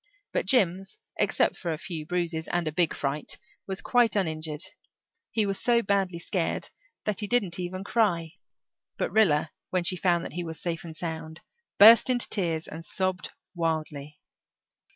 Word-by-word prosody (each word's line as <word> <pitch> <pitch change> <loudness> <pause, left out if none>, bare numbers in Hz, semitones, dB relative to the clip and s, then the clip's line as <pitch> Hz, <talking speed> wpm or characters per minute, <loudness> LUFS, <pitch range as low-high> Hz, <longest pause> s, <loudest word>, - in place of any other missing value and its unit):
But - - 0
Jims, 195 - +2 0.2
except - - +2
for 170 - -3
a 160 - -2
few 160 -2 -6
bruises, 170 -2 -2
and 175 -2 -1
a - - 0
big 165 +1 +2
fright, 145 +1 -3 0.3
was 190 0 -2
quite 240 -4 +3
uninjured. 155 -4 -1 0.7
He 220 -2 +1
was 195 -1 -2
so 235 -1 +3
badly 195 -3 0
scared 170 0 -2 0.4
that 210 -3 -1
he 210 - -2
didn't 200 -7 +1
even 185 +1 -4
cry, 185 -7 +1 0.7
but - - -1
Rilla, 160 -8 +3 0.2
when 185 -1 0
she 185 - +3
found 175 -2 +1
that - - -7
he 175 - -3
was 160 -2 -6
safe 170 -1 -3
and 165 -2 -8
sound, 160 -1 -5 0.4
burst 225 +5 +9
into 245 -1 +3
tears 170 -5 0
and 160 +2 -8
sobbed 185 +1 -2 0.2
wildly. 155 -3 -3
175 Hz, 165 wpm, -27 LUFS, 160-195 Hz, 0.7 s, burst